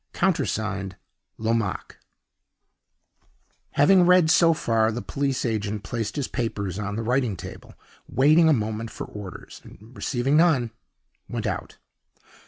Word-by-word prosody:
Countersigned, 110 - -1 0.4
LOMAQUE." 110 -3 -2 1.8
Having 175 +5 +5
read 180 -3 +5
so 165 -1 +5
far, 115 -8 +1
the 115 - -4
police 135 0 -2
agent 105 -3 -2
placed 110 0 -4
his 145 -3 -2
papers 100 -6 -3
on 105 0 -3
the 115 - -3
writing 120 -4 0
table, - - -10 0.3
waited 155 +5 +5
a 160 - +5
moment 110 -1 -2
for - - -7
orders, 100 -4 -10
and, 110 +6 -16
receiving 135 +3 0
none, 150 -9 +3 0.6
went - - -4
out. - - -4
115 Hz, 125 wpm, -24 LUFS, 105-145 Hz, 1.8 s, Having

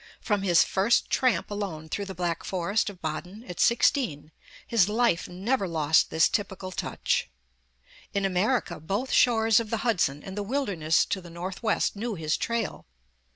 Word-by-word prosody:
From 205 -3 0
his 175 -4 +5
first 200 +5 +1
tramp 245 -8 +1
alone 190 -7 -4
through 200 +6 -3
the 190 -1 -7
Black 175 -1 -2
Forest 190 +4 0
of 190 -3 -13
Baden, 180 +7 -5
at 180 - -8
sixteen, 235 - +2 0.3
his 210 -5 +3
life 230 -5 +1
never 195 +4 -1
lost 160 -2 +2
this 160 - +4
typical 190 -3 -3
touch. - - -1 0.8
In 200 -1 0
America, 190 -1 0
both 200 - -3
shores 225 -3 +4
of 225 -2 -4
the 225 +1 -2
Hudson, 155 - +1
and 190 - -8
the 205 - -2
wilderness 200 - +1
to 190 - -3
the 175 - -12
North 175 +3 -6
west 220 -1 +1
knew 220 +1 -3
his 155 -2 -1
trail. 230 - -3
195 Hz, 165 wpm, -27 LUFS, 170-225 Hz, 0.8 s, his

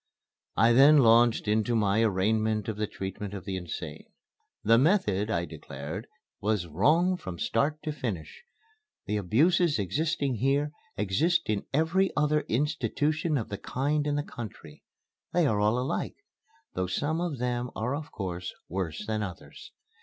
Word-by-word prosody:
I 115 +2 +5
then 140 +5 +7
launched 115 -3 +5
into 110 +2 +1
my 105 0 +2
arraignment 110 +1 +1
of 110 - -2
the 105 0 -1
treatment 95 0 -6
of 95 - -7
the 95 -2 -3
insane. 90 -3 -6 0.6
The 115 +2 +5
method, 110 - +2
I 85 -5 0
declared, 80 +4 -7 0.3
was 105 -3 0
"wrong 155 - +2
from 95 - -7
start 145 - 0
to 155 - -2
finish. 120 - -5 0.6
The 105 +1 -1
abuses 145 - +3
existing 140 - -1
here 140 +5 +1 0.3
exist 130 - +2
in 105 -2 -2
every 165 +6 +2
other 150 0 +3
institution 150 +4 0
of 115 - -3
the 100 - -5
kind 145 +3 -1
in 145 - 0
the 145 - 0
country. 120 -6 -9 0.5
They 175 -2 +3
are 110 -7 +2
all 105 +3 +2
alike 125 +2 -2 0.6
though 95 0 -1
some 150 - -1
of 170 -6 -2
them 125 0 -2
are 120 +4 -1
of 150 +2 -5
course 90 -3 -5
worse 90 0 -3
than 110 -1 -1
others. 105 - -8
115 Hz, 155 wpm, -28 LUFS, 100-150 Hz, 0.6 s, then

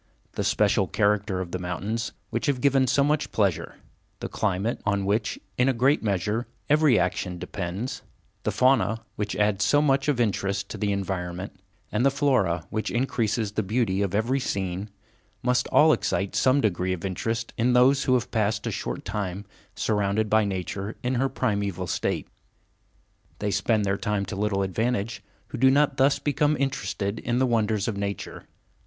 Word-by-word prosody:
The - - -3
special - - +2
character 100 -2 +1
of 90 -2 -6
the 90 - -3
mountains, 100 +6 -3 0.2
which 115 0 -1
have 140 -3 +1
given 135 -1 +3
so 140 +3 +3
much 150 +1 0
pleasure; 100 -6 0 0.4
the - - -4
climate, 105 +2 -1
on 100 -1 0
which, 105 +2 0 0.2
in 125 +2 +4
a - - +2
great 135 +5 +3
measure, 105 +3 -1 0.2
every 150 -5 +5
action 90 -2 -1
depends; 90 +6 -4 0.4
the - - -1
fauna, 120 -4 +2
which 105 -1 -3
adds 105 0 +2
so 145 - +4
much 135 -2 +2
of 145 -4 +1
interest 100 -3 0
to - - -6
the 105 -1 0
environment; 95 -1 -4 0.3
and 105 +3 +1
the 140 - +5
flora, 130 - +1
which 110 0 -2
increases 115 -4 0
the 105 - -1
beauty 105 -1 0
of 100 -1 -1
every 120 +6 +1
scene—must 105 +5 -3
all 155 0 +5
excite 100 -8 -1
some 130 +2 +3
degree 95 -3 0
of 90 +1 -5
interest 115 +5 -3
in 125 +2 +2
those 130 +3 +4
who 130 - +4
have 120 - -1
passed 110 -1 0
a - - -1
short - - -4
period - - -10
of 100 - -5
time 100 -1 -3 0.3
surrounded 105 0 0
by 110 0 +5
nature 100 +1 -3
in 125 +1 0
her 130 +2 +1
primeval 100 -8 -1
state. - - -2 1.1
They 105 -1 -2
spend 105 +2 +1
their 95 0 0
time 105 -2 -1
to 95 - -6
little 100 -1 0
advantage 110 +2 -1 0.3
who 135 - -6
do 130 +1 +6
not 140 0 +3
thus 135 +1 +4
become 150 +1 +1
interested 110 -6 -2
in 120 0 -1
the 130 - +3
wonders 110 -4 +1
of 110 - -1
nature. 100 0 -5
110 Hz, 175 wpm, -26 LUFS, 100-125 Hz, 1.1 s, do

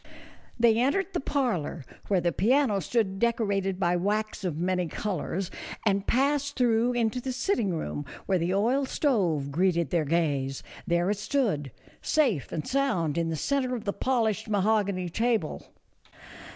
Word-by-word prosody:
They 230 -1 +4
entered 375 +10 +1
the - - 0
parlor, 225 - -1 0.2
where 195 -3 +2
the 175 0 +1
piano 220 - +2
stood 195 +1 -1
decorated 200 -5 0
by 175 -2 +2
wax 210 +4 -1
of 175 -5 -2
many 180 +1 0
colors, 190 +1 -3 0.3
and 200 -2 +1
passed 285 +2 +1
through 240 -1 +3
into 240 0 0
the 260 - -3
sitting 255 - 0
room, 145 -2 -4 0.2
where 190 -2 +1
the 170 +2 0
oil 240 +8 +2
stove 175 - +1
greeted 170 -1 +1
their 165 -3 +1
gaze; 140 -4 0 0.2
there 175 +3 +2
it 205 - -2
stood, 210 - 0 0.3
safe 250 - +1
and 155 - -4
sound, 185 - 0
in 165 -1 0
the 165 - -1
centre 255 - 0
of 230 - -5
the 200 - -1
polished 220 -4 0
mahogany 200 -3 +1
table. 225 -2 -1
205 Hz, 150 wpm, -27 LUFS, 175-245 Hz, 0.3 s, They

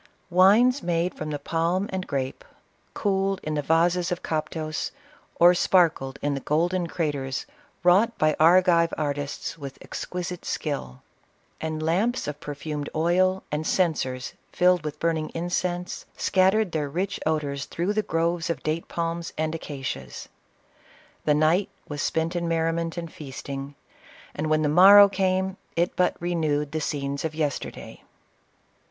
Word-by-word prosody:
Wines 215 +9 +5
made 175 +1 0
from 155 - -6
the 150 - -2
palm 170 +6 -1
and 190 0 -3
grape, 135 -2 -3 0.5
cooled 195 -1 0
in 155 - -3
the 150 - 0
vases 170 +4 +2
of 180 - -3
Cop 155 -1 -2
tos, 155 0 -4 0.4
or 175 +1 +7
sparkled 165 -7 +2
in 145 0 +1
the 140 - -2
golden 170 +5 0
craters 145 -6 -2 0.4
wrought 195 +7 +4
by 155 0 +2
Ar 175 +4 +6
gi\rc 170 -2 +3
artists 145 +2 -3
with 140 -2 -7
exquisite 180 -1 -5
skill; 65 - -4 0.6
and 155 -1 -3
lamps 200 - 0
of 150 0 -5
per 150 -2 -6
fumed 150 0 -4
oil, 185 +4 +2
and 150 +1 -2
censers 135 -8 0 0.2
filled 180 -2 +3
with 150 -1 -5
burning 160 -2 0
incense, 175 +1 -2
scattered 190 +1 +2
their 150 -3 -2
rich 185 +6 -2
odors 145 -3 -1
through 180 +5 -2
the 215 - +1
groves 170 -1 -1
of 170 - -3
date 155 +2 -2
palms 170 0 -3
and 155 0 -1
acacias. 135 - -6 1.0
The 150 - +4
night 160 +6 +3 0.2
was 145 -1 -4
spent 165 +2 -1
in 170 -1 -1
merriment 165 0 -1
and 170 -2 -6
feasting, 140 0 -7 0.6
and 155 - -3
when 155 0 +2
the - - +2
morrow 195 +6 +9
came, 190 -1 0 0.2
it 170 +1 0
but 180 -1 +1
re 175 +1 -2
newed 150 -3 0
the 155 - -2
scenes 140 -1 -3
of 160 -1 -3
yesterday. 150 -4 -4
165 Hz, 150 wpm, -25 LUFS, 150-180 Hz, 1.0 s, morrow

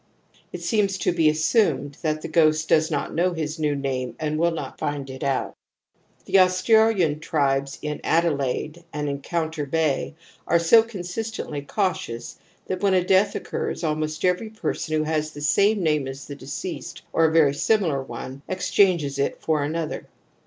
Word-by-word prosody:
It 175 -1 -7
seems 195 +1 +1
to - - +1
be 165 -3 +3
assumed 155 - +1
that 155 -2 -1
the - - -3
ghost 155 -1 +3
does 155 0 +3
not 145 -3 -2
know 180 +2 +1
his 160 -1 -4
new 150 -2 +1
name 130 -2 -3
and 155 0 -1
will 170 +1 +3
not 155 -5 -6
find 145 -2 -3
it 130 - -7
out. 135 -1 -1 0.7
The 195 - +4
Australian 185 -3 +4
tribes 140 -3 0
on 150 - -4
Adelaide 155 0 0
and 150 0 -3
Encoimter 155 +2 -3
Bay 155 -1 0 0.3
are 170 - +4
so 170 +7 +6
consistently 215 -6 -5
cautious 145 - -3 0.3
that 185 -1 -3
when 195 -2 +3
a 180 - +3
death 195 +2 +3
occurs - - -4
almost 155 +1 -1
every 180 +5 +1
person 170 -7 -2
who 155 - +1
has 155 0 -1
the 145 -1 -10
same 200 +6 +3
name 150 -4 +1
as 135 +1 -7
the 145 - -7
deceased - - -6
or 165 - +4
a 160 - +3
very 155 -4 +4
similar 165 -5 +1
one, 130 0 -8
exchanges 175 -6 +2
it 140 - -1
for 155 -2 0
another. 155 +2 -3
155 Hz, 165 wpm, -24 LUFS, 145-180 Hz, 0.7 s, so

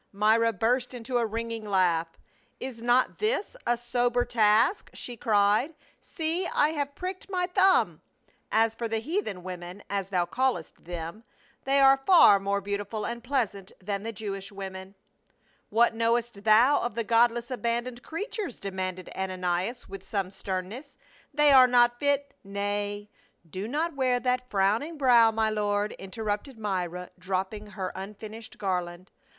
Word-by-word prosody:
Myra 220 +3 +3
burst 245 +5 0
into 245 +1 -2
a 230 - +1
ringing 230 0 -4
laugh. 180 -5 +2 0.3
" - - -39
Is 255 -3 -6
not 245 +2 +2
this 430 +1 -1
a 240 - +2
sober 245 0 0
task?" 225 - +3
she 245 - -6
cried. 215 +6 +2 0.3
"See, 335 +2 -2
I 295 - +2
have 285 -2 -3
pricked 370 +1 -6
my 365 -2 0
thumb. 380 +1 +3 0.5
As 225 0 +3
for 230 +1 -4
the 225 0 -1
heathen 225 - -3
women, 180 +1 -8
as 195 -1 -2
thou 180 -3 +1
callest 245 -5 -2
them, 170 +5 -6 0.4
they 275 +1 +3
are 270 0 +6
far 335 - +8
more 200 +1 -1
beautiful 205 +2 -3
and 235 0 -5
pleasant 225 -8 -2
than 200 +1 -3
the 225 +2 -4
Jewish 195 -1 -6
women." 190 0 -8 0.4
" - - -45 0.3
What 230 +2 +3
knowest 230 -2 -1
thou 235 +7 +5
of 240 -3 -3
the 230 - -1
godless 235 +2 +2
abandoned 240 0 -2
creatures?" 405 - -5
demanded 185 -2 -5
Ananias 185 +4 -2
wdth 195 -1 -9
some 195 -3 -3
sternness. 195 +8 -6 0.2
" - - -26
They 295 0 +4
are 260 -2 +8
not 240 -1 +4
fit 285 0 0
— - - -44
" - - -45
" - - -45 0.2
Nay, 205 0 -2 0.4
do 190 +5 -5
not 310 +5 -1
wear 255 -2 +1
that 250 0 -1
frowning 215 +12 +1
brow, 245 -5 +6
my 220 0 0
lord," 205 0 0
interrupted 210 +5 -4
Myra, 180 -4 -3
dropping 190 +3 -3
her 195 -3 -5
unfinished 215 +4 -9
garland. 180 -3 -3
225 Hz, 160 wpm, -27 LUFS, 195-250 Hz, 0.5 s, far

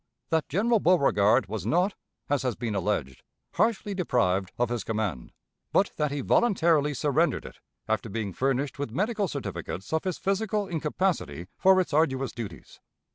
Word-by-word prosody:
That 160 -1 0
General 220 - +2
Beauregard 130 - +4
was 105 +3 -5
not, 180 +4 +2 0.3
as 145 -2 +1
has 125 -4 -1
been 115 -2 -3
alleged, 90 -10 -2 0.3
harshly 210 0 +1
deprived 100 - +1
of 120 -1 +1
his 120 -3 -2
command, 105 - -3 0.4
but - - +3
that 150 -1 +1
he 140 0 -3
voluntarily 165 - +3
surrendered 150 +5 +1
it, - - -11 0.3
after 110 +1 -1
being 105 -2 -3
furnished 135 +3 -1
with 145 - -2
medical 205 - 0
certificates 95 - -5
of 160 - +1
his 185 -3 -1
physical 205 +1 -1
incapacity 160 - -1
for 190 0 +5
its 180 -4 -1
arduous 135 -5 +2
duties. 105 -8 -8
145 Hz, 155 wpm, -27 LUFS, 110-185 Hz, 0.4 s, for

